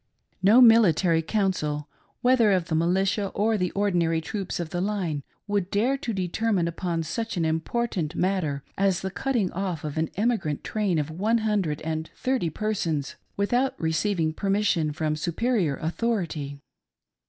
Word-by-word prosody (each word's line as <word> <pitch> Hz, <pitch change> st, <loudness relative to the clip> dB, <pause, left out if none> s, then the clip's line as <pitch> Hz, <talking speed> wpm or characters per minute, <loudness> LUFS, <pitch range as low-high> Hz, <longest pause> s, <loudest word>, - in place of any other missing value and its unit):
No 210 Hz, +7 st, +6 dB
military 190 Hz, -8 st, +5 dB
council, 160 Hz, -6 st, -1 dB, 0.3 s
whether 245 Hz, -4 st, +4 dB
of 180 Hz, -3 st, 0 dB
the -, -, -1 dB
militia 190 Hz, +5 st, +1 dB
or 220 Hz, +2 st, +2 dB
the 180 Hz, -3 st, 0 dB
ordinary 175 Hz, -5 st, +1 dB
troops 190 Hz, +3 st, -4 dB
of 165 Hz, -2 st, -4 dB
the 175 Hz, -, -1 dB
line, 185 Hz, -7 st, -1 dB, 0.2 s
would 200 Hz, -3 st, -1 dB
dare 230 Hz, +8 st, +2 dB
to 270 Hz, -4 st, -4 dB
determine 190 Hz, -1 st, 0 dB
upon 170 Hz, 0 st, -2 dB
such 225 Hz, +6 st, -3 dB
an 165 Hz, -, +1 dB
important 165 Hz, +1 st, -1 dB
matter 170 Hz, -7 st, 0 dB, 0.2 s
as 195 Hz, -2 st, +2 dB
the 190 Hz, -, -3 dB
cutting 235 Hz, -3 st, 0 dB
off 185 Hz, -4 st, -3 dB
of 150 Hz, 0 st, -3 dB
an 160 Hz, -, 0 dB
emigrant 205 Hz, -9 st, 0 dB
train 205 Hz, -6 st, 0 dB
of 150 Hz, 0 st, -1 dB
one 210 Hz, +8 st, +1 dB
hundred 190 Hz, -9 st, 0 dB
and 160 Hz, 0 st, -3 dB
thirty 255 Hz, -9 st, 0 dB
persons 165 Hz, -6 st, -2 dB, 0.2 s
without 245 Hz, +6 st, +1 dB
receiving 160 Hz, 0 st, 0 dB
permission 195 Hz, -4 st, +1 dB
from 155 Hz, 0 st, -1 dB
superior 175 Hz, -, 0 dB
authority. 165 Hz, -6 st, -2 dB
185 Hz, 150 wpm, -26 LUFS, 160-210 Hz, 0.3 s, No